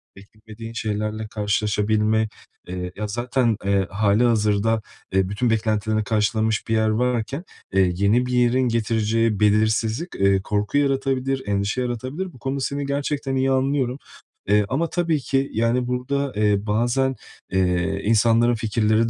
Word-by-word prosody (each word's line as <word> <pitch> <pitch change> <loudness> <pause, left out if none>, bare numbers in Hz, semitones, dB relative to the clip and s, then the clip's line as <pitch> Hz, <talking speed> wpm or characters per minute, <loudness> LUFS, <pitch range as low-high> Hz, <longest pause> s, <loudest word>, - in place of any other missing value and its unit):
beklemediğin 110 +3 -11
şeylerle 110 -1 -3
karşılaşabilme, 105 +1 +1 0.4
eee 90 0 -5
ya, 105 +1 -3
zaten, 120 +1 0
eee, 100 -1 +1
hâlihazırda, 105 +1 +2 0.3
eee, 95 -1 +2
bütün 105 +4 0
beklentilerini 110 -1 0
karşılamış 110 0 0
bir 115 - 0
yer 110 0 +2
varken, 125 +6 -1 0.3
eee, 95 -2 +3
yeni 100 +7 +2
bir 125 - -4
yerin 125 +1 +3
getireceği 115 -1 +1
belirsizlik, 110 - +1
eee, 100 0 +3
korku 105 +6 -1
yaratabilir, 135 -1 0
endişe 100 +4 0
yaratabilir. 130 +9 -4
Bu 125 - -15
konuda 135 +3 -3
seni 140 +1 -2
gerçekten 140 -1 -2
iyi 135 0 +1
anlıyorum. 130 -1 0 0.5
Eee, 105 +1 +3
ama 160 +6 0
tabii 170 -3 0
ki, 135 +1 -1
yani, 115 +2 +1
burada, 135 +2 -2
eee, 105 -1 +1
bazen, 120 +5 +1 0.4
eee, 95 +1 0
insanların 115 +2 +3
fikirleri 110 0 +1
110 Hz, 135 wpm, -22 LUFS, 105-130 Hz, 0.5 s, eee